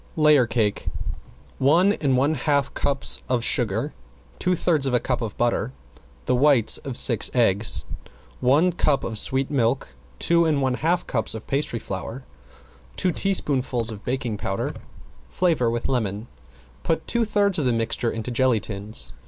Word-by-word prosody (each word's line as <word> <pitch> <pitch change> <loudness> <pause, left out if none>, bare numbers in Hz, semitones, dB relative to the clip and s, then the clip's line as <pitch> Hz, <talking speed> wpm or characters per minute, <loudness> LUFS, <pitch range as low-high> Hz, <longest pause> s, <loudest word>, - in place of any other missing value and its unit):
~LAYER 150 -5 +4
CAKE~ 110 -3 -1 0.7
One 170 +9 +4
and 135 -9 0
one 140 +4 +2
half 140 0 0
cups 140 -1 -1
of 125 -2 0
sugar, 120 +4 +1 0.5
two 180 0 +1
thirds 155 -5 +2
of 125 - +1
a - - +3
cup 125 0 -2
of 110 -3 -5
butter, 120 +1 0 0.5
the - - +1
whites 135 -3 +4
of 135 -3 -7
six 115 -5 +3
eggs, 105 - +2 0.5
one 150 +8 +3
cup 150 -4 +1
of 110 -2 -4
sweet 135 +4 0
milk, 130 -1 0 0.3
two 170 0 +3
and 155 -3 +1
one 130 -2 +1
half 165 +7 0
cups 110 0 0
of 110 - -8
pastry 140 -3 -1
flour, 110 +5 -6 0.7
two 185 - +1
teaspoonfuls 135 - 0
of 105 -1 -9
baking 125 -4 -3
powder, 95 -1 -3 0.6
flavor 160 -10 +1
with 120 0 -2
lemon, 110 -4 -2 0.6
put 160 -1 -1
two 235 -1 0
thirds 205 -4 +1
of 145 - -1
the 125 - +2
mixture 115 0 0
into 115 +2 -4
jelly 125 -1 +2
tins. 105 +1 -2
130 Hz, 160 wpm, -23 LUFS, 115-150 Hz, 0.7 s, ~LAYER